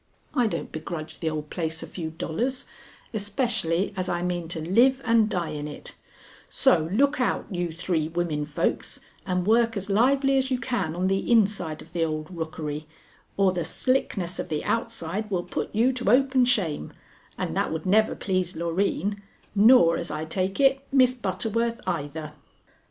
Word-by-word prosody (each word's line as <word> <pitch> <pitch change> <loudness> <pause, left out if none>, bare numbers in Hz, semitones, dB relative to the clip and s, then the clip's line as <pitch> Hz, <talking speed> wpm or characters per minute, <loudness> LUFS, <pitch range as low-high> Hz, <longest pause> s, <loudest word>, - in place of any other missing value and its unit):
I 245 -2 +3
don't - - -4
begrudge 155 0 -6
the 160 - -1
old 155 -1 -5
place 160 -2 -3
a - - -5
few 165 -3 -5
dollars, 235 +11 -2 0.5
especially 205 -4 0
as 185 -1 -2
I 175 0 -1
mean 175 -2 -2
to 165 0 -3
live 235 +11 +4
and 225 -2 +4
die 175 -6 -1
in 150 -1 -4
it; 150 - -8 0.6
so 160 0 +3
look 275 +6 +2
out, 250 - 0
you 175 -2 -2
three 165 -1 -1
women 165 -3 -1
folks, 150 - -1 0.3
and 180 -1 0
work 225 +1 +3
as 200 +1 -3
lively 270 +5 +3
as 260 0 -1
you 255 - +1
can 195 -12 -2
on 180 +1 -1
the 195 +4 0
inside 195 -8 +2
of 165 - -20
the 170 -1 +1
old 155 +2 -3
rookery, 155 -2 -4 0.5
or 195 -1 +4
the 175 -2 -2
slickness 195 -9 0
of - - -4
the 150 -1 -2
outside 215 -3 -2
will 180 -3 -1
put - - -3
you 235 +5 +3
to 250 -5 0
open 260 +1 +4
shame, 185 - 0 0.5
and 80 - -3
that - - 0
would 160 0 -4
never 215 +4 +3
please 185 -3 -1
Loreen, 195 +4 -1 0.3
nor, 205 -5 +6
as 170 - -4
I 155 - -3
take 185 - -2
it, 270 0 +4
Miss 255 -2 +5
Butterworth 230 +2 -1
either." 150 -1 -3
185 Hz, 175 wpm, -26 LUFS, 160-230 Hz, 0.6 s, nor